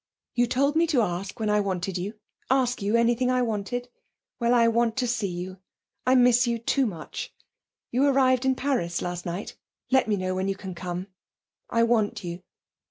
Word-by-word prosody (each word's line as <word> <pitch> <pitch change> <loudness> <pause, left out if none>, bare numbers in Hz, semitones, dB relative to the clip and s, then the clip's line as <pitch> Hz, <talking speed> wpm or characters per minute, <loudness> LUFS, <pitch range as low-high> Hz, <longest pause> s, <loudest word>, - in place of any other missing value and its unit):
You 245 0 +2
told 280 +4 +1
me 335 +1 +4
to 275 -8 +3
ask 190 +1 -3
you - - -9
when 210 - +1
I 210 - +3
wanted 190 -2 -2
you 195 +4 -3 0.3
ask 255 -3 +2
you 205 +3 +1
anything 235 +2 +3
I 255 0 +2
wanted. 235 +2 -2 0.5
Well, 235 -1 +2
I 235 -1 +5
want 230 0 +1
to 255 - +1
see 230 -4 0
you. 180 +1 -6 0.5
I 255 - +5
miss 245 -1 +5
you 235 0 +1
too 255 +3 +1
much. 170 -7 -6 0.6
You 265 +4 +3
arrived 260 -2 +3
in 265 0 +2
Paris 250 -12 -1
last 175 0 -4
night. 175 +4 -5 0.4
Let 265 -2 +4
me 210 - +2
knew 185 -1 -2
when 185 +1 -1
you 195 - 0
can 190 -1 -7
come. 180 +1 -5 0.6
I 230 - +3
want 230 -4 +1
you. 175 0 -5
230 Hz, 195 wpm, -26 LUFS, 190-250 Hz, 0.6 s, I